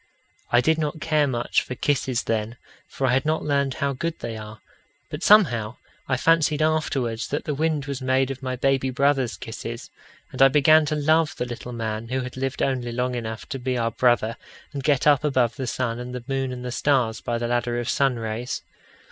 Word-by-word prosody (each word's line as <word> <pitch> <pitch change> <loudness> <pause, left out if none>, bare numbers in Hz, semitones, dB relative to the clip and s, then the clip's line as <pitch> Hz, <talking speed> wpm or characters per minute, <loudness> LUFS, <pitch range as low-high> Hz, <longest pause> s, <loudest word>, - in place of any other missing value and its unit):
I 120 - +5
did 160 +5 +2
not 155 0 -2
care 155 -2 +2
much 120 -2 0
for 125 - -6
kisses 130 -3 0
then, 115 +1 -2 0.3
for 135 - -3
I 125 - +2
had 130 - +2
not 155 +1 0
learned 140 -2 0
how 140 -3 -1
good 165 +5 -3
they 115 - -5
are; 110 0 -9 0.5
but 150 - -5
somehow 125 - +4 0.3
I 130 - +2
fancied 155 +1 +3
afterwards 135 -7 0
that 145 - -3
the 150 - -2
wind 155 -1 0
was 140 -1 -5
made 130 +1 +1
of 135 -1 -7
my 130 -1 -3
baby 135 +1 +1
brother's 135 -1 +1
kisses, 115 0 -7 0.4
and 130 - -4
I 135 - +10
began 150 +3 +5
to 155 - 0
love 155 +1 +2
the 125 - -2
little 120 0 -7
man 110 -1 -4
who 130 +2 -1
had 125 0 -7
lived 135 +1 -2
only 125 -3 -1
long 125 +1 -1
enough 110 -2 -5
to 135 -3 -4
be 130 0 -1
our 115 -1 0
brother 120 -1 +2 0.4
and 140 -2 -4
get 140 -2 +2
up 145 -2 +5
above 130 -5 +1
the 130 - -4
sun 120 -1 -2
and 125 +1 -6
the 125 - -6
moon 135 -1 -1
and 125 0 -6
the 125 - -3
stars 125 -4 +1
by 120 - -2
the 120 0 -2
ladder 120 0 0
of 120 - -4
sun 135 +2 +2
rays. 115 +2 -4
130 Hz, 215 wpm, -24 LUFS, 120-145 Hz, 0.5 s, I